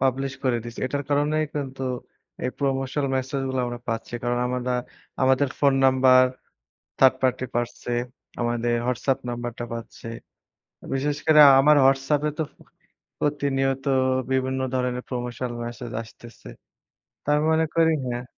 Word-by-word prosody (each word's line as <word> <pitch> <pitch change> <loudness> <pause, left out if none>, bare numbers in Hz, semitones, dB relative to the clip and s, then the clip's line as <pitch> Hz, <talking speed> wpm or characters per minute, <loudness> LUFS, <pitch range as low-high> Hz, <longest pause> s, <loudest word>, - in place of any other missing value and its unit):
Publish 135 +1 0
করে 125 -2 +2
দিছি, 120 0 -9
এটার 140 +2 -3
কারণেই 150 +2 +2
কিন্তু 135 -2 -4 0.6
এই 125 - 0
Promotional 135 0 -1
message 135 +1 -2
গুলা 130 -1 -1
আমরা 120 0 -5
পাচ্ছি। 115 +1 -3
কারণ 120 0 0
আমরা 125 0 -2 0.5
আমাদের 130 +2 +3
ফোন 140 -2 +4
নাম্বার 130 -1 +6 0.8
থার্ড 130 -1 +6
পার্টি 130 0 +1
পাচ্ছে, 120 0 -3 0.4
তারা - - -14
আমাদের 120 0 0
হোয়াটসঅ্যাপ 125 +2 0
নাম্বারটা 120 0 -4
পাচ্ছে। 115 0 -8 0.9
বিশেষ 145 +2 0
করে 155 -1 +7 0.2
আমার 150 +2 +5
হোয়াটসঅ্যাপে 135 +3 +2
তো - - +2
ফো - - -31 0.6
প্রতিনিয়ত 135 -2 0 0.5
বিভিন্ন 130 0 0 0.2
ধরনের 125 -1 -1
Promotional 120 -1 -4
message 120 0 -7
আসতেছে। 115 - -14 0.8
তার 150 +1 +3
মনে 160 0 +3
করি 165 -1 +4 0.2
হ্যাঁ। 120 0 -3
130 Hz, 135 wpm, -24 LUFS, 120-140 Hz, 0.9 s, করে